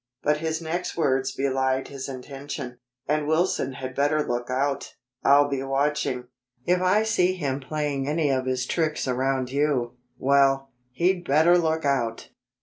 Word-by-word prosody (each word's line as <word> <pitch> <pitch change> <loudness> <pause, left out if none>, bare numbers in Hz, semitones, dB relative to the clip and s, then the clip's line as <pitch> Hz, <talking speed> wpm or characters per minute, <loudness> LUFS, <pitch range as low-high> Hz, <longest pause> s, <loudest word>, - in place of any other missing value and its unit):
But 150 +1 +2
his 160 +1 -3
next 170 +3 -3
words 135 -4 +1
belied 130 0 0
his 135 -1 -6
intention. 130 -1 -7 0.3
"And 150 +1 0
Wilson 160 -4 +1
had 130 0 -6
better 145 +2 +1
lookout. 130 +3 -2 0.3
I'll 145 +1 +6
be 140 -2 -2
watching. 135 -1 0 0.4
If 180 +1 +2
I 185 +4 +3
see 185 -5 +2
him 140 -6 -2
playing 145 -1 -2
any 150 -1 +1
of 130 -1 0
his 130 -1 0
tricks 155 0 -1
around 130 0 0
you 135 -4 0 0.2
well, 135 0 +3 0.2
he'd 175 +6 +1
better 160 +5 +5
look 160 -2 +1
out!" 120 -5 -1
140 Hz, 145 wpm, -25 LUFS, 130-155 Hz, 0.4 s, I'll